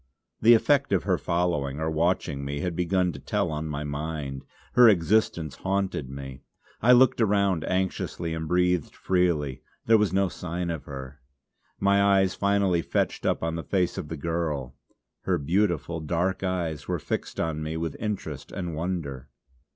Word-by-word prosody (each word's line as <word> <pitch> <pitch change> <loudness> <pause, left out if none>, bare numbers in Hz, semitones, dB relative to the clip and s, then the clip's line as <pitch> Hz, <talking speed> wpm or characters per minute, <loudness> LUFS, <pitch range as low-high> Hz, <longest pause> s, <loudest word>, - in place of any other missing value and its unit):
The 115 +2 +8
effect 140 +3 +2
of 95 - +2
her 95 -2 +1
following 85 -5 -1
or 80 - -1
watching 80 -3 0
me 70 +1 -3
had 90 -2 -2
begun 90 +1 +1
to 70 - -9
tell 100 +4 -1
on 75 +1 -3
my 75 -1 -3
mind; 70 -2 -4 0.3
her 125 -2 +8
existence 85 -5 +1
haunted 95 -8 -1
me. 65 0 -8 0.4
I 120 - +5
looked 125 -1 +5
around 100 -5 +2
anxiously, 95 -3 -2
and 80 -1 -4
breathed 90 -1 +1
freely. 80 -8 0 0.2
There 110 -1 +5
was 105 -4 +2
no 95 +1 +2
sign 85 +1 -4
of 80 -3 -5
her. 70 0 -8 0.6
My 100 0 +3
eyes 95 -1 +4
finally 100 -4 +2
fetched - - -1
up - - 0
on 80 0 -1
the 80 0 -4
face 90 -3 0
of - - -5
the 80 - -5
girl.... 75 -5 -2 0.5
Her 90 -2 +2
beautiful, 85 +1 0
dark 85 +4 -1
eyes 85 -6 -2
were - - 0
fixed - - -4
on 80 -2 -1
me 80 +1 -3
with 80 -2 -3
interest 105 -2 -4
and 90 -3 -4
wonder. 75 -5 -4
85 Hz, 165 wpm, -26 LUFS, 75-95 Hz, 0.6 s, The